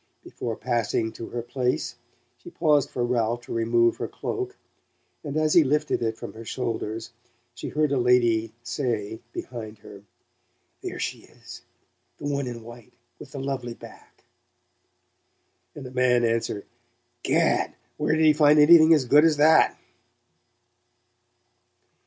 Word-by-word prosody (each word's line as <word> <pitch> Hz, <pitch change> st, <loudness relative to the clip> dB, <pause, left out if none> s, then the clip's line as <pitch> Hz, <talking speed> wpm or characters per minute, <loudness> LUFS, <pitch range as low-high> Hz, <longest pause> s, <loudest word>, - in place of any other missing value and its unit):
Before 115 Hz, -2 st, -5 dB
passing 115 Hz, -2 st, -1 dB
to 115 Hz, -, -8 dB
her 120 Hz, -1 st, -5 dB
place 125 Hz, 0 st, -2 dB, 0.5 s
she -, -, -11 dB
paused 155 Hz, -5 st, +2 dB
for 120 Hz, -, -2 dB
Ralph 120 Hz, -1 st, 0 dB
to -, -, -8 dB
remove 115 Hz, 0 st, +2 dB
her -, -, -3 dB
cloak, 390 Hz, 0 st, -5 dB, 0.7 s
and 145 Hz, -1 st, -4 dB
as 155 Hz, 0 st, +2 dB
he 170 Hz, -, +7 dB
lifted 150 Hz, 0 st, 0 dB
it 110 Hz, -1 st, -2 dB
from -, -, -8 dB
her 115 Hz, -, -10 dB
shoulders 115 Hz, -2 st, -4 dB, 0.4 s
she 120 Hz, -, -7 dB
heard 150 Hz, -1 st, 0 dB
a 140 Hz, -, +1 dB
lady 120 Hz, -3 st, +2 dB
say 115 Hz, -4 st, -3 dB
behind 110 Hz, -4 st, -7 dB
her: 100 Hz, -1 st, -13 dB, 0.8 s
"There -, -, -6 dB
she -, -, -4 dB
is -, -, -13 dB, 0.6 s
the -, -, -9 dB
one 140 Hz, -2 st, -1 dB
in 120 Hz, -2 st, -7 dB
white, 120 Hz, +1 st, -13 dB, 0.3 s
with 135 Hz, -, -12 dB
the 140 Hz, -, -5 dB
lovely 135 Hz, -3 st, -4 dB
back -, -, -15 dB, 0.7 s
" -, -, -47 dB
and 145 Hz, -, -8 dB
a 125 Hz, -, -8 dB
man 125 Hz, -1 st, +2 dB
answer: 115 Hz, -3 st, -1 dB, 0.6 s
"Gad! -, -, +1 dB, 0.2 s
Where 155 Hz, -, +1 dB
did 160 Hz, 0 st, +3 dB
he 155 Hz, -, +6 dB
find 150 Hz, 0 st, +5 dB
anything 160 Hz, +1 st, +8 dB
as 140 Hz, -4 st, 0 dB
good 145 Hz, +5 st, +6 dB
as 160 Hz, -2 st, +3 dB
that?" 155 Hz, +2 st, +5 dB
125 Hz, 145 wpm, -25 LUFS, 115-150 Hz, 0.8 s, anything